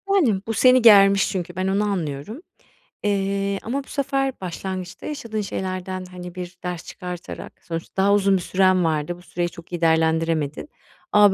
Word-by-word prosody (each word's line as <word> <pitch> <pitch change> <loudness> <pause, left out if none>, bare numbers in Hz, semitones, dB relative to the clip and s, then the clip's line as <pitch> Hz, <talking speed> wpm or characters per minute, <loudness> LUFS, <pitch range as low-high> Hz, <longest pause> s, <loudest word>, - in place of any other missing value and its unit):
Yani 235 - +3
bu 225 - -1
seni 255 +2 +5
germiş 200 -3 +7
çünkü, 180 -2 -4
ben 185 0 -1
onu 195 +2 +1
anlıyorum. 185 - -3 0.6
Eee, 200 -1 0
ama 270 +5 -2
bu - - -23
sefer 270 -1 -1
başlangıçta 185 0 -5
yaşadığın 230 -8 -4
şeylerden, 185 -1 -4
hani, 180 -1 -9
bir 180 0 -7
ders 180 -2 -4
çıkartarak 180 -1 -7
Sonuçta 165 +3 -4
daha 200 +1 +4
uzun 195 -1 +4
bir - - -4
süren 185 0 +3
vardı, 160 +2 -1
bu 175 - -15
süreyi 175 -1 -3
çok 170 +1 -14
iyi 175 - -3
değerlendiremedin 160 - +1 0.4
ama 205 -2 +6
185 Hz, 165 wpm, -23 LUFS, 175-205 Hz, 0.6 s, germiş